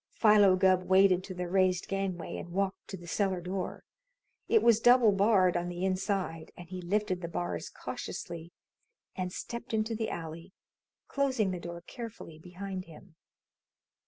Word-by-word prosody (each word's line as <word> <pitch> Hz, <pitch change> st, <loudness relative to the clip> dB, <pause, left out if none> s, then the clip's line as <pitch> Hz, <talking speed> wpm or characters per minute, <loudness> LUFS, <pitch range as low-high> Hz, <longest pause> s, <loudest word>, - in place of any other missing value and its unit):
Philo 210 Hz, -4 st, +5 dB
Gubb 185 Hz, 0 st, +4 dB
waded 190 Hz, -1 st, +5 dB
to 185 Hz, -, -7 dB
the 180 Hz, 0 st, -3 dB
raised 185 Hz, 0 st, +2 dB
gangway 195 Hz, -3 st, -3 dB
and -, -, -7 dB
walked 195 Hz, +1 st, -2 dB
to 190 Hz, -, -6 dB
the 175 Hz, -, -12 dB
cellar 190 Hz, +1 st, 0 dB
door. 180 Hz, +1 st, -4 dB, 0.6 s
It 445 Hz, -, +4 dB
was 230 Hz, -2 st, +5 dB
double 240 Hz, -2 st, +6 dB
barred 195 Hz, -2 st, +4 dB
on 175 Hz, 0 st, -1 dB
the 175 Hz, +1 st, -3 dB
inside, 185 Hz, -3 st, -2 dB
and 175 Hz, -, -10 dB
he 185 Hz, +1 st, -6 dB
lifted 190 Hz, 0 st, -1 dB
the 170 Hz, -, -3 dB
bars 90 Hz, -, -3 dB
cautiously 170 Hz, 0 st, -7 dB, 0.6 s
and 185 Hz, -2 st, -3 dB
stepped 235 Hz, +3 st, -5 dB
into 220 Hz, +1 st, 0 dB
the 220 Hz, 0 st, -2 dB
alley, 165 Hz, +2 st, -7 dB, 0.5 s
closing 260 Hz, -8 st, +1 dB
the 180 Hz, -, -4 dB
door 170 Hz, 0 st, -7 dB
carefully 220 Hz, -6 st, -9 dB
behind 185 Hz, +2 st, -6 dB
him. 165 Hz, +1 st, -15 dB
185 Hz, 160 wpm, -30 LUFS, 175-205 Hz, 0.6 s, double